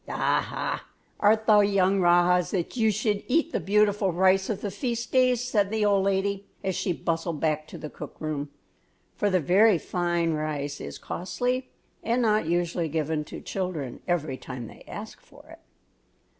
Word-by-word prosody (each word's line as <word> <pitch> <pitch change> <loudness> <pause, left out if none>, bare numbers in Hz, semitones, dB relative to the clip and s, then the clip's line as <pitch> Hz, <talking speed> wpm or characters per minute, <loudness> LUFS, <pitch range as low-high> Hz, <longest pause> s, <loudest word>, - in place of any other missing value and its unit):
"Aha! - - -1 0.4
art 220 +1 +3
thou 215 -2 +6
young 200 -1 +3
rajahs 175 -1 +4
that 180 +2 -2
you 225 -3 +3
should 210 0 0
eat 325 +4 +2
the - - 0
beautiful 205 -1 +2
rice 190 +2 +3
of 205 -2 -2
the 205 - -3
feast 235 +2 -3
days?" 255 -2 +3
said 205 -5 +1
the 215 0 0
old 200 -2 +3
lady, 195 0 0 0.2
as 190 -1 0
she 185 - -1
bustled 165 -1 -2
back 155 -1 0
to - - -9
the 155 - -6
cook - - -9
room; 150 -2 -3 0.7
for 205 - +1
the 185 -1 +3
very 190 +6 +5
fine 175 0 -1
rice 150 -2 -3
is - - -7
costly, 250 +8 -3 0.3
and 235 +2 +1
not 215 -5 +2
usually 170 -1 0
given 155 0 -1
to - - -9
children 170 -10 -4
every 160 -6 -1
time 125 -2 -7
they - - -13
ask - - -8
for - - -18
it. - - -13
190 Hz, 170 wpm, -26 LUFS, 165-210 Hz, 0.7 s, thou